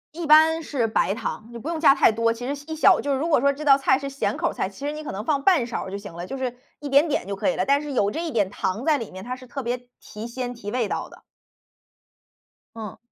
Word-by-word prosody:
一 340 0 -4
般 315 +2 +6
是 250 -6 -1
白 205 -2 +1
糖， 215 0 -5
你 235 - -8
不 275 - -8
用 335 0 -2
加 310 -3 +6
太 - - +5
多， 230 +1 +1
其 245 +2 -5
实 285 - -1
小 285 - -11
1 - - -3
小 - - +5
就 285 - -2
是 270 - +1
如 320 - -1
果 300 -7 +3
说 280 +1 +4
这 290 +2 -7
道 275 -2 +7
菜 270 0 +2
是 275 0 -5
咸 275 +1 -2
口 - - 0
儿 - - -6
菜， - - -2
其 280 - -9
实 295 - -2
你 305 - -7
可 300 - -5
能 195 +2 -4
放 280 -1 0
半 325 -11 +4
勺 240 - -3
儿 190 - -8
就 200 - -3
行 200 -3 -9
了， 170 +1 -6
就 270 +8 -6
是 255 -2 -3 0.2
一 290 - -6
点 280 +3 +5
点 285 - -1
就 200 - -3
可 235 - 0
以 - - -1
了。 - - +1
但 280 +1 +3
是 295 - -6
有 205 -6 +2
这 320 - -4
一 330 - -3
点 205 -5 +1
糖 195 +5 -3
在 305 -2 +4
里 230 - -7
面， 185 +2 -9
它 250 +1 -4
是 255 0 -13
特 275 +2 -6
别 245 +1 -2 0.2
提 210 +1 -9
鲜、 245 +1 -4
提 210 -4 -7
味 245 -4 0
道 - - -4
的。 - - -16 1.5
嗯。 215 -4 -7
260 Hz, 320 characters per minute, -24 LUFS, 225-290 Hz, 1.5 s, 道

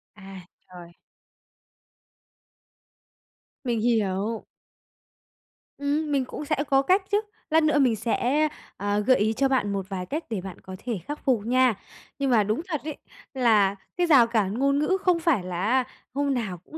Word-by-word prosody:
À, 195 -3 -11 0.2
trời! 175 -2 -12 2.7
Mình 240 -3 -1
hiểu. 220 -1 0 1.3
Ừm, 290 +2 -1
mình 275 -2 +1
cũng 295 - -7
sẽ 305 - 0
có 270 0 +4
cách 370 +8 +3
chứ. 410 +1 +3 0.3
Lát 320 0 +4
nữa 305 -1 +3
mình 250 -5 +3
sẽ, 250 +7 +1 0.3
à, 205 +1 0
gợi 255 +5 +4
ý 215 +2 +1
cho 270 +4 +2
bạn 255 -6 +1
một 195 -1 -3
vài 185 -2 -4
cách 305 - -4
để 215 -5 -3
bạn 190 -1 -9
có 185 - -9
thể 235 -6 -2
khắc 295 +1 -4
phục 240 -7 +1
nha. 255 0 +3 0.5
Nhưng 275 -1 0
mà 220 -3 +5
đúng 215 +7 -1
thật 310 -5 -3
ấy, 305 -1 -5 0.4
là 215 -7 +3 0.2
cái 355 -1 +2
rào 270 -8 +6
cản 215 -4 0
ngôn 275 +1 +2
ngữ 375 +6 +1
không 360 -2 +2
phải 325 - +1
là 180 -1 -4
á, 250 +6 +2 0.3
hôm 280 0 0
nào 215 -8 -3
cũng 190 - -12
245 Hz, 170 wpm, -25 LUFS, 205-285 Hz, 2.7 s, rào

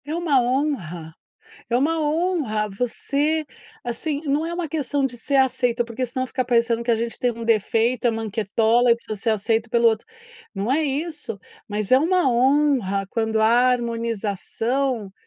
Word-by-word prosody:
É 300 +2 -3
uma 320 -7 +2
honra, 220 - -2 0.5
é 235 - +2
uma 320 +5 +1
honra 300 - 0
você, 285 +8 -1 0.4
assim, 285 +5 -3
não 295 +2 0
é 340 - -4
uma 350 -1 -2
questão 290 -2 -1
de 260 -2 -2
ser 275 +4 0
aceita, 245 -2 +2
porque 240 +2 -4
senão 255 +2 -3
fica 255 - -2
parecendo 235 -1 +1
que 235 - -1
a 230 - +3
gente 230 +1 -4
tem 245 -1 +1
um 230 0 -7
defeito, 230 +2 +1
é - - +4
manquetola 225 +2 +1
e - - +1
precisa 225 -2 -7
ser 225 - 0
aceito 220 +2 0
pelo 235 0 +4
outro, 220 -1 -2 0.5
não 205 +5 -1
é 310 +3 +2
isso, 295 -5 -3 0.3
mas 210 +1 -3
é 260 - +8
uma 355 +4 +2
honra 250 -6 +2
quando 220 -1 0
há - - +5 0.3
harmonização 230 0 -2
240 Hz, 170 wpm, -23 LUFS, 225-280 Hz, 0.5 s, é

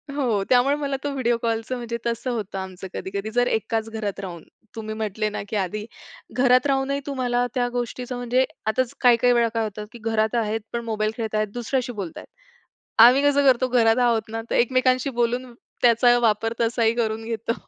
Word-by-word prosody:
हो 230 -8 +1
त्यामुळे 255 +3 +4
मला 280 -2 -2
तो 290 - -1
व्हिडिओ 240 -3 +1
कॉलचं 230 +2 -2
म्हणजे 235 -1 -4
तसं 235 +2 -2
होतं 210 -4 -4
आमचं 190 0 -7
कधी-कधी 200 +3 -4
जर 245 +1 +2
एकाच 225 +1 -1
घरात 215 -3 -4
राहून 175 -4 -7 0.3
तुम्ही 215 -1 -5
म्हंटले 215 0 -2
ना, - - -5
की - - -4
आधी 205 +3 -2 0.5
घरात 255 +2 +4
रा 275 - +3
हूनही 275 +1 -1
तुम्हाला 245 -3 0
त्या 245 -1 +1
गोष्टीचं 245 +1 -3
म्हणजे 245 +2 +1 0.2
आताच 250 +2 0
काही-काही 245 0 +5
वेळा 235 -1 +3
काय 225 -1 0
होतं 210 0 -5
की 235 - -10
घरात 220 +1 0
आहेत 225 -1 0
पण 235 - -2
मोबाईल 215 -1 -1
खेळतायेत, 215 -1 -1
दुसऱ्याशी 245 +1 -2
बोलतायेत. 170 - -8 0.8
आम्ही 255 +4 +7
कसं 285 -1 +3
करतो 255 0 +4
घरात 230 -2 +3
आहोत 230 -2 +2
ना, 225 0 -4
तर - - -1
एकमेकांशी 255 +2 +2
बोलून 245 +1 -1 0.3
त्याचा 240 0 +5
वापर 225 0 +1
तसाही 230 -1 +2
करून 225 -1 -1
घेतो. 230 0 -2
235 Hz, 185 wpm, -23 LUFS, 220-250 Hz, 0.8 s, आम्ही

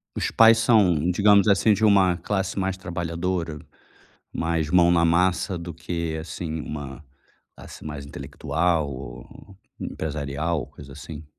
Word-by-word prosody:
Os - - -1
pais 115 0 +6
são, 95 -8 +3
digamos 100 +2 +4
assim, 100 +2 +4
de 105 +2 +1
uma 95 -3 +4
classe 95 +2 -2
mais 95 0 -1
trabalhadora, 85 -2 -3 0.8
mais 80 -2 -1
mão 85 0 +5
na 85 -1 +3
massa 90 +2 +1
do 85 -1 -7
que, 85 0 -4
assim, 80 0 -5
uma 70 -2 -7 0.5
classe - - -12
mais 75 -2 -7
intelectual 80 +2 -2
ou 65 +8 -11 0.2
empresarial, 75 0 -3
coisa 70 -2 -13
assim? 75 +2 -9
85 Hz, 130 wpm, -24 LUFS, 75-95 Hz, 0.8 s, pais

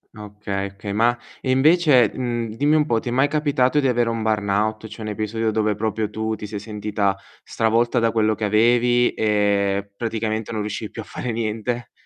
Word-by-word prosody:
Ah, 105 - -9
okay, 100 -1 -4
okay, 100 +1 -6
ma 120 +3 +2 0.2
e 130 - -1
invece, 140 - +5
ehm, 120 -3 -3
dimmi 145 +5 +2
un 150 -1 +3
po', 115 -6 +1
ti - - -4
è - - -3
mai 135 +3 +3
capitato 145 -2 +1
di 135 - +1
avere 120 -1 +1
un 115 -1 -2
burnout? 110 0 0
Cioè 110 - -11
un 105 - -3
episodio 110 +1 -2
dove 110 -1 0
proprio 110 0 -2
tu 110 +1 -3
ti 105 - -7
sei 105 0 -5
sentita 105 -2 -2 0.3
stravolta 115 +2 +1
da 115 -1 +2
quello 110 -1 +2
che 105 0 -3
avevi 120 +3 +3
e 100 -2 +1
praticamente 110 -1 -2
non 105 - -2
riuscivi 105 +1 -5
più - - -6
a - - -10
fare 125 - -5
niente? 115 +1 -3
110 Hz, 200 wpm, -22 LUFS, 105-120 Hz, 0.3 s, invece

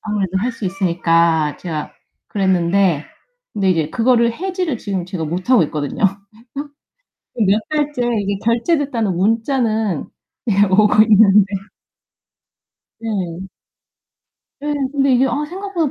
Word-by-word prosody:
아무래도 195 -3 -2
할 235 +6 -1
수 230 - -8
있으니까 170 -4 +1
제가 160 -4 -5 0.4
그랬는데 185 -4 +1 0.5
근데 195 -3 +1
이제 160 -3 0
그거를 235 -1 +2
해지를 360 - -3
지금 195 -5 -3
제가 180 -3 -4
못하고 185 +7 +2
있거든요. 145 +2 -4 1.3
그래서 220 -4 0
몇 210 +3 +3
달째 295 -4 -1 0.2
이게 200 0 -2
결제됐다는 235 - 0
문자는 220 - 0 0.4
이게 205 -2 +3
오고 210 +2 +4
있는데 210 -2 +5 1.6
네. 230 - -5 1.5
네. 295 0 -2 0.2
근데 275 -1 +2
이게 260 +2 +3
아 285 +4 -1
생각보다 370 -4 -2
210 Hz, 270 characters per minute, -18 LUFS, 185-250 Hz, 1.6 s, 있는데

